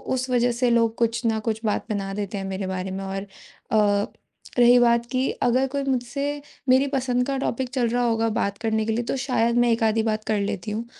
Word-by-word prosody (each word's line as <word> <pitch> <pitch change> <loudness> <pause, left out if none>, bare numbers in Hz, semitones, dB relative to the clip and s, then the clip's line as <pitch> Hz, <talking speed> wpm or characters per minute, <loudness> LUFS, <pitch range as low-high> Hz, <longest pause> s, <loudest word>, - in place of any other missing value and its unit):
उस 255 0 -3
वज़ह 245 -1 +2
से 245 +1 +1
लोग 230 -1 +2
कुछ 235 0 0
न 225 -1 +1
कुछ 220 -1 -1
बात 210 - 0
बना 195 -2 -3
देते 200 0 -4
हैं 195 - -4
मेरे 190 0 -4
बारे 185 0 -3
में। 195 +1 -4
और 195 0 -3 0.5
अ, 205 -2 +3 0.5
रही 245 +1 +7
बात 235 0 +3
कि 255 +1 +1
अगर 255 +2 +3
कोई 280 -1 -1
मुझसे 280 +3 -2 0.3
मेरी 260 +2 +5
पसंद 250 -1 0
का 275 -1 -1
टॉपिक 260 -1 -2
चल 245 -3 +1
रहा 245 +1 0
होगा 225 -1 +1
बात 200 0 -1
करने 220 -1 -1
के 225 - -1
लिए, 235 +2 -1
तो - - -1
शायद 240 -3 +1
मैं 240 -1 +4
एक 230 0 +1
आधी 220 0 +2
बात 215 -1 -1
कर 215 -2 +1
लेती 205 0 -3
हूँ। 225 +3 -3
230 Hz, 230 wpm, -24 LUFS, 210-250 Hz, 0.5 s, रही